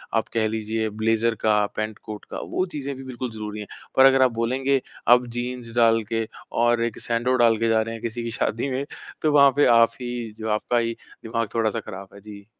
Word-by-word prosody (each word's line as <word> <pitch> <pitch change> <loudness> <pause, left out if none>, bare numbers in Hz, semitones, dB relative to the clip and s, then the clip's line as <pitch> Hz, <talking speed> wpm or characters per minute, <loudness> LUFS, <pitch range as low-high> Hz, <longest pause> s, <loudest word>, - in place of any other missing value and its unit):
आप 110 - +1
कह 110 -1 +1
लीजिए 110 0 -2
ब्लेज़र 115 +2 +1
का, 105 -1 +3
पैंट-कोट 110 0 -5
का - - -4
वो 185 - +1
चीज़ें 140 -1 -4
भी 135 - -9
बिल्कुल 130 -1 -5
ज़रूरी 105 -1 -6
है। 105 - -6 0.3
पर 130 - +7
अगर 135 0 +6
आप 130 -1 +5
बोलेंगे, 130 +4 0 0.3
अब 125 +1 +6
जीन्स 120 -1 -5
डाल 115 -1 +4
के 115 -1 -1 0.4
और 120 0 +3
एक 115 - -4
सैंडो 120 +2 0
डाल 115 -1 +5
के 115 +1 0
जा 110 0 +3
रहे 115 +1 -4
हैं, 115 - -9
किसी 115 0 -4
की 115 - -4
शादी 115 +3 -1
में 135 +2 -2 0.4
तो 155 - +2
वहाँ 140 -1 +6
पे 145 - +4
आप 115 - +6
ही 120 -2 -4
जो 110 0 -4
आपका 105 +3 0
ही 115 0 0 0.3
दिमाग 115 0 -2
थोड़ा-सा 115 0 +1
ख़राब 100 -3 -9
है। 100 - -13
जी। 100 -1 -11
115 Hz, 220 wpm, -24 LUFS, 110-125 Hz, 0.4 s, पर